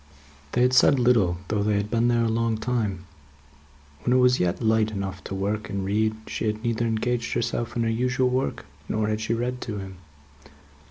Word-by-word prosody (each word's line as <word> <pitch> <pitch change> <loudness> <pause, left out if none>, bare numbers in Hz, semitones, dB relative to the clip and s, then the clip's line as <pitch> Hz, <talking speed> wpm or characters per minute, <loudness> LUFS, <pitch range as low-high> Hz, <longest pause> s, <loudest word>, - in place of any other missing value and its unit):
They 125 - +3
had 125 +1 +3
said 130 +2 +6
little, 115 -9 +3
though 105 +1 0
they 105 0 +1
had 100 +1 -2
been 115 0 +2
there 120 -1 +2
a - - +1
long 115 0 0
time. 110 -6 -2 1.0
When 125 - +1
it - - +4
was 125 0 +4
yet 90 0 0
light 110 -1 +3
enough 100 -3 -5
to 95 - -4
work 105 +3 -2
and 100 -1 -3
read, 110 +2 +1
she 110 - -3
had 110 +1 -2
neither 115 -1 0
engaged 120 +1 -1
herself 115 0 -2
in 120 - +1
her - - 0
usual 125 +2 +1
work, 130 - -1 0.2
nor 110 0 0
had 110 0 -1
she 115 +1 0
read 125 +2 -3
to 110 -4 -4
him. 95 -2 -7
110 Hz, 205 wpm, -25 LUFS, 105-120 Hz, 1.0 s, said